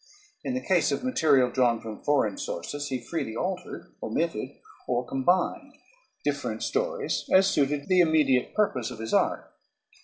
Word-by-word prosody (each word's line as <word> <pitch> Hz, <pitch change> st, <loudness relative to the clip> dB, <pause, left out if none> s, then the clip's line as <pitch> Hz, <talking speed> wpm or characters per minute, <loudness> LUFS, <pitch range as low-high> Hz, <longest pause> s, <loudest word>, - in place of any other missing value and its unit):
In 255 Hz, -, -2 dB
the 255 Hz, -, -4 dB
case 180 Hz, -5 st, +3 dB
of 140 Hz, -, -2 dB
material 150 Hz, -, +3 dB
drawn 120 Hz, -3 st, +2 dB
from 110 Hz, -1 st, -8 dB
foreign 135 Hz, -9 st, +2 dB
sources 145 Hz, +12 st, -4 dB
he 130 Hz, -2 st, -2 dB
freely 115 Hz, -3 st, -4 dB
altered, 180 Hz, +7 st, -4 dB
omitted, -, -, -2 dB, 0.4 s
or 125 Hz, 0 st, 0 dB
combined 155 Hz, +9 st, 0 dB, 0.5 s
different -, -, -2 dB
stories -, -, -1 dB
as 190 Hz, +1 st, +6 dB
suited 145 Hz, -5 st, +1 dB
the 185 Hz, -1 st, +4 dB
immediate 150 Hz, -6 st, +2 dB
purpose 130 Hz, -, +1 dB
of 125 Hz, -, -8 dB
his 110 Hz, 0 st, -5 dB
art. -, -, +1 dB
145 Hz, 150 wpm, -27 LUFS, 125-185 Hz, 0.5 s, as